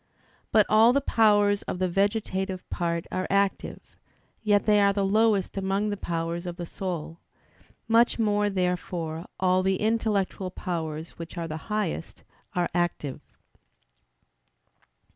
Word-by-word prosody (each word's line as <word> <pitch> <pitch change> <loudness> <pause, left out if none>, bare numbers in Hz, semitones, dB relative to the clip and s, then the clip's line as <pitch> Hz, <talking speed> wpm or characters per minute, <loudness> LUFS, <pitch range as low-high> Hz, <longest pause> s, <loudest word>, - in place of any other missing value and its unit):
But 215 -2 +5
all 225 +3 +6
the 280 - +3
powers 205 -4 +3
of - - -3
the 185 0 +1
vegetative 190 -1 -1
part 170 -1 -1
are 185 0 -2
active; 200 0 -1 0.4
yet 205 -2 +2
they 210 -1 +4
are 200 0 +4
the 200 -1 0
lowest 210 -1 +2
among 195 +2 0
the - - -1
powers 170 -1 -3
of 175 - -4
the 175 - -5
soul. 170 -2 -5 0.7
Much 230 +1 +4
more, 210 -2 +2
therefore, 180 -3 -2
all 185 0 +3
the 190 0 +1
intellectual 210 -4 0
powers, 160 -3 -4
which 165 +2 -8
are 165 -1 -3
the 155 -1 -4
highest, 210 -6 -3 0.3
are 175 -1 +1
active. 175 -6 -2
190 Hz, 135 wpm, -26 LUFS, 175-205 Hz, 0.7 s, all